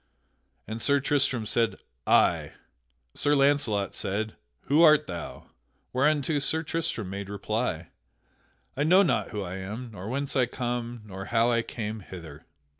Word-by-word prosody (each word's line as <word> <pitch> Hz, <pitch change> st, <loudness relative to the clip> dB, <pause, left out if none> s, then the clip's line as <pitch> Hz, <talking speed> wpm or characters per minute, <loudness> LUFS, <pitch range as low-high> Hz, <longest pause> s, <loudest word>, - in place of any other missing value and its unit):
And 110 Hz, +1 st, -5 dB
Sir 140 Hz, +3 st, +3 dB
Tristram 135 Hz, -4 st, +1 dB
said, 115 Hz, +1 st, +1 dB, 0.3 s
"Ay." -, -, +3 dB, 0.6 s
Sir 145 Hz, 0 st, +2 dB
Launcelot 135 Hz, -8 st, +2 dB
said, 110 Hz, +3 st, -2 dB, 0.3 s
"Who 150 Hz, +4 st, +3 dB
art 155 Hz, -3 st, +7 dB
thou?" 85 Hz, -2 st, -8 dB, 0.4 s
Whereunto 145 Hz, +2 st, +2 dB
Sir 160 Hz, +3 st, +1 dB
Tristram 155 Hz, -, -2 dB
made 100 Hz, 0 st, -5 dB
reply: 100 Hz, -4 st, -2 dB, 0.9 s
"I 140 Hz, -, -2 dB
know 180 Hz, +6 st, +6 dB
not 175 Hz, -, +1 dB
who 105 Hz, -2 st, -4 dB
I 95 Hz, +1 st, -5 dB
am, 110 Hz, +6 st, -6 dB
nor 100 Hz, 0 st, -7 dB
whence 140 Hz, +2 st, -2 dB
I 125 Hz, -3 st, +3 dB
come, 120 Hz, -1 st, -4 dB
nor 95 Hz, -1 st, -7 dB
how 115 Hz, +3 st, +2 dB
I 115 Hz, 0 st, +2 dB
came 110 Hz, -2 st, -5 dB
hither." 85 Hz, -6 st, -11 dB
115 Hz, 145 wpm, -27 LUFS, 100-140 Hz, 0.9 s, art